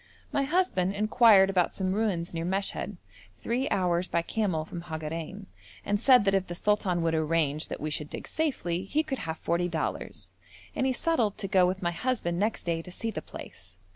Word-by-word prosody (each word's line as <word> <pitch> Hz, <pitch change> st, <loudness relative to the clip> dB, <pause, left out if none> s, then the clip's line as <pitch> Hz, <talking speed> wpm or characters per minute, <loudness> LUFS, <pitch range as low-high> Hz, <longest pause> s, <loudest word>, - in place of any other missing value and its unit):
My 275 Hz, -, +1 dB
husband 270 Hz, -, +1 dB
inquired 210 Hz, -2 st, +6 dB
about 180 Hz, -2 st, +1 dB
some 185 Hz, -1 st, -1 dB
ruins 195 Hz, -6 st, -1 dB
near 165 Hz, 0 st, -2 dB
Meshed, 190 Hz, +3 st, -2 dB, 0.4 s
three 250 Hz, +4 st, -1 dB
hours 180 Hz, -1 st, +1 dB
by 170 Hz, -, 0 dB
camel 180 Hz, -7 st, -1 dB
from 170 Hz, +1 st, -7 dB
Hagarein, 165 Hz, +4 st, -5 dB, 0.4 s
and 205 Hz, +1 st, 0 dB
said 250 Hz, -4 st, +6 dB
that 195 Hz, -, +3 dB
if 195 Hz, -1 st, +1 dB
the 175 Hz, -, -5 dB
sultan 185 Hz, -3 st, +1 dB
would 165 Hz, -1 st, +1 dB
arrange 155 Hz, -1 st, +1 dB
that -, -, -5 dB
we 155 Hz, +1 st, -3 dB
should 150 Hz, 0 st, -3 dB
dig -, -, -7 dB
safely, 190 Hz, -, -1 dB
he 305 Hz, +10 st, 0 dB
should 270 Hz, -3 st, -2 dB
have 160 Hz, 0 st, -4 dB
forty 170 Hz, +1 st, 0 dB
dollars, 165 Hz, -2 st, -4 dB, 0.4 s
and 265 Hz, -, +1 dB
he -, -, +2 dB
settled 245 Hz, -7 st, 0 dB
to 195 Hz, -, -3 dB
go 185 Hz, -1 st, +4 dB
with 185 Hz, +1 st, -2 dB
my 175 Hz, -, +1 dB
husband 175 Hz, -4 st, -1 dB
next 215 Hz, +3 st, 0 dB
day 165 Hz, -1 st, -1 dB
to 180 Hz, -, -11 dB
see 225 Hz, +5 st, -3 dB
the -, -, -4 dB
place. 90 Hz, 0 st, -11 dB
185 Hz, 200 wpm, -28 LUFS, 170-215 Hz, 0.4 s, inquired